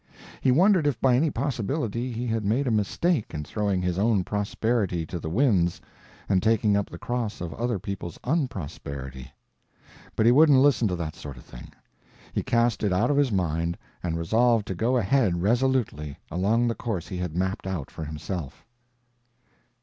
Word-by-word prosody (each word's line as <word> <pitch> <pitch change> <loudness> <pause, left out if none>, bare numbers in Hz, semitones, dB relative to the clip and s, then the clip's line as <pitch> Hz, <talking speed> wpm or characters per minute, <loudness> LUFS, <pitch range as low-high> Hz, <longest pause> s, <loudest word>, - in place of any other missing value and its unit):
He - - +2
wondered 180 +2 +4
if 145 - 0
by 130 -2 +4
any 155 +5 +3
possibility 125 -2 -2
he 120 +1 -3
had 115 -2 -1
made 115 +8 +1
a 125 - +1
mistake 110 - 0
in 75 - -3
throwing 100 +2 -1
his 90 0 -1
own 105 -2 +2
prosperity 105 -3 -1
to 85 - -5
the 80 - -5
winds 95 - +2 0.5
and 95 -2 +2
taking 110 -2 +3
up 100 0 0
the 85 - -8
cross 120 +1 -3
of 85 -2 -5
other 120 -1 -1
people's 90 -2 -6
unprosperity. 70 - -4 0.8
But 110 - +2
he 120 - +7
wouldn't 145 +1 +6
listen 130 -5 +4
to 90 - -1
that 80 -2 -4
sort 70 -3 -9
of - - -12
thing; - - -12 0.6
he - - 0
cast 115 -1 +1
it 105 - +1
out 105 +9 +2
of 140 - +1
his 140 -4 +3
mind 85 -3 0 0.2
and 85 -2 -2
resolved 110 +6 +2
to - - -1
go 115 +8 +1
ahead 100 -6 +2
resolutely 115 - 0
along 110 +8 +2
the 115 - +1
course 105 -7 -4
he 95 - -5
had 90 -3 -4
mapped 95 +1 -1
out 90 -8 -4
for 80 - -7
himself. 75 0 -6
105 Hz, 180 wpm, -26 LUFS, 85-120 Hz, 0.8 s, he